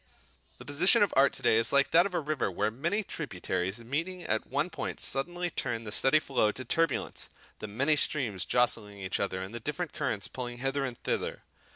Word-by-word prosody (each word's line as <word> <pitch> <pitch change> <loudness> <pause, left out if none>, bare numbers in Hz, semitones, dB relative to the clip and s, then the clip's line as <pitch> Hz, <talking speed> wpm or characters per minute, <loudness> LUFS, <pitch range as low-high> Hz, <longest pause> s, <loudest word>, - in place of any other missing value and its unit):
The - - -12
position 180 +10 +5
of 200 - 0
art 140 +1 +5
to 135 - -8
day 110 - +4
is 115 - +4
like 140 -1 +4
that 170 +3 +6
of 185 - -7
a - - +2
river 150 -7 -1
where 105 +3 -1
many 170 - 0
tributaries 95 - -3
meeting 160 +10 -4
at 110 - -1
one - - 0
point, - - -4
suddenly 175 +6 -1
turn 115 -6 -2
the 105 - -6
steady 135 +7 +4
flow 130 -8 +1
to 130 - -6
turbulence, 165 +7 -1 0.3
the 110 - -5
many 135 +9 +2
streams 120 - 0
jostling 105 -4 0
each 95 -1 -2
other 95 -2 -2
and 95 +4 -8
the 120 - -4
different 150 +6 -4
currents 135 -9 -2
pulling 120 -1 -6
hither 135 +2 -1
and 125 -3 -4
thither. - - -2
135 Hz, 205 wpm, -30 LUFS, 110-155 Hz, 0.3 s, that